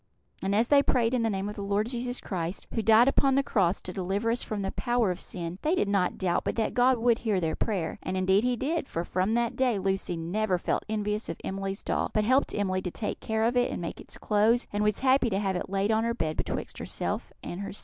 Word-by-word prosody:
And 195 +1 0
as 230 +3 +2
they 285 -1 +6
prayed 240 -3 +1
in 250 - +2
the 225 - +1
name 195 -1 -2
of 210 - -5
the - - -6
Lord 200 +1 0
Jesus 245 +1 -3
Christ, 175 -1 -4
who 225 - 0
died 225 +3 +6
upon 275 -1 +3
the 275 - +3
cross 190 -7 +1
to 180 - -7
deliver 195 +5 -1
us 240 - -1
from 210 -2 -3
the 195 - -2
power 240 -5 +1
of 180 - -5
sin, 175 +1 -5
they 315 +4 +2
did 210 - +1
not 200 -2 +1
doubt 180 -2 0
but - - -2
that 225 - 0
God 250 +1 +4
would 235 0 +2
hear 215 -5 0
their 160 -2 -1
prayer; 190 -7 -2
and 185 0 -3
indeed 190 +3 +3
He 250 0 +2
did, 295 +5 -2
for 165 - -2
from 185 +6 0
that 235 -1 0
day 250 -4 +2
Lucy 190 -2 -1
never 185 +4 0
felt - - -1
envious 210 0 -2
of - - -4
Emily's 195 +1 -4
doll, - - 0
but 215 - +3
helped 260 +5 +2
Emily 185 -2 0
to 180 - -3
take 210 +4 -4
care 220 0 -1
of 235 +2 +2
it 245 0 +3
and - - -4
make 170 - -5
its - - -9
clothes, 220 +3 +2
and 205 +1 0
was 210 -1 +1
happy 260 -2 +4
to 195 - 0
have 195 -2 0
it 180 - -3
laid 195 +2 +1
on 220 0 +2
her 235 0 0
bed 155 -7 -2
betwixt - - -4
herself - - -3
and 175 - -5
sister. 200 0 -6
210 Hz, 260 wpm, -28 LUFS, 190-235 Hz, -, they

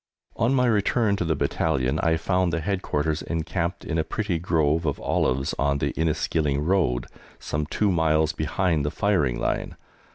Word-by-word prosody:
On 120 +4 +2
my 125 -1 +3
return 110 -1 +2
to 90 - -1
the 80 -1 +1
Battalion 70 -2 0
I 80 -1 +2
found 90 +1 +1
the 85 - -1
Headquarters 80 -4 -1
encamped 85 +2 -3
in 80 0 -1
a - - +2
pretty 100 -4 -2
grove 80 -2 +1
of 70 - -1
olives 70 +5 0
on 70 0 +2
the - - -1
Inniskilling 75 -2 0
Road, 85 -10 +1 0.3
some 75 0 -3
two 105 +5 +1
miles 80 -2 +2
behind 80 0 0
the 75 - 0
firing 75 -7 +1
line. - - -2
80 Hz, 165 wpm, -25 LUFS, 75-95 Hz, 0.3 s, my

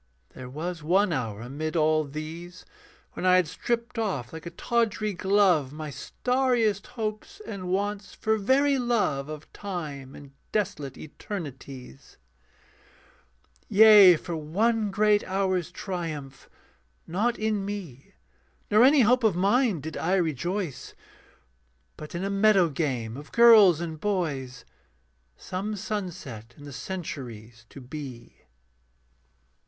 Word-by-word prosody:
There 125 -1 -10
was 165 +5 -5
one 185 +4 +2
hour 115 -7 -3
amid 150 +6 -5
all 155 -1 +3
these 160 +5 -8 0.5
When - - -6
I 185 0 +5
had 185 -1 +4
stripped 235 +7 -3
off 185 - -2
like 160 +1 -8
a - - -3
tawdry 215 +2 -1
glove 185 -7 +2
My 155 0 -6
starriest 245 - 0
hopes 220 - -4
and 185 -3 -6
wants, 200 +1 -2
for 220 0 +1
very 275 +6 +3
love 210 - 0
Of 155 0 -9
time 150 -9 -6
and 140 -1 -12 0.2
desolate 150 -10 -2
eternities. 140 - -9 1.5
Yea, 205 -4 +8
for 170 +2 -5
one 210 +8 0
great 210 +1 +3
hour's 185 -2 0
triumph, 165 -8 -6 0.6
not 220 +8 0
in 215 -2 -1
me 190 -10 -7 0.6
Nor 215 +3 +6
any 275 +2 +6
hope 250 +2 +4
of 215 -5 +3
mine 200 - +2
did 160 +2 -6
I 180 +4 +1
rejoice, 175 -1 -2 1.0
But 150 +2 -9
in 175 - -3
a 195 - -1
meadow 195 -3 +4
game 130 -7 -2
of 145 +3 -10
girls 220 -8 +7
and 160 -2 -5
boys 145 - -2 0.7
Some 195 +3 -4
sunset 175 - -6
in 145 - -13
the 145 -1 -9
centuries 120 - -7
to - - -11
be. 130 -2 -9
180 Hz, 125 wpm, -26 LUFS, 145-210 Hz, 1.5 s, Yea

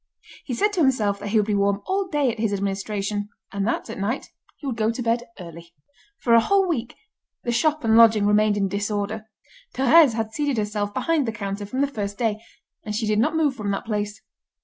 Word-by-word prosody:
He 250 - -3
said 415 - +1
to 375 - -1
himself 215 -8 +2
that 205 - -6
he 215 +2 +1
would 210 - +3
be 210 - -1
warm 200 0 +1
all 385 0 -1
day 290 -7 +1
at 225 - -9
his 215 -2 0
administration, 200 +1 -2 0.2
and 200 0 -2
that, - - -1
at 225 - -7
night, 215 +7 -3 0.3
he - - -12
would 260 -4 -2
go 220 -1 +1
to 230 +2 -3
bed 235 +1 0
early. 170 -1 -11 0.5
For 235 - +2
a 230 - +8
whole 390 - +2
week, 245 -9 -2 0.5
the 240 - -1
shop 305 +5 +1
and 220 -1 +3
lodging 225 -2 +6
remained 210 0 +3
in 195 -1 +1
disorder. 205 +2 -3 0.5
Thérèse 270 +1 +6
had 220 -1 -2
seated 290 -4 -1
herself 210 -1 -2
behind 305 +4 0
the - - 0
counter 200 -1 -5
from 255 +6 -2
the - - +4
first 205 -7 -5
day, 220 -2 -1 0.4
and 210 0 -4
she 220 +1 -1
did 210 0 +1
not 305 +8 +1
move 305 -4 +2
from 210 -5 -4
that 195 - -2
place. 210 -1 -3
220 Hz, 220 wpm, -23 LUFS, 205-255 Hz, 0.5 s, a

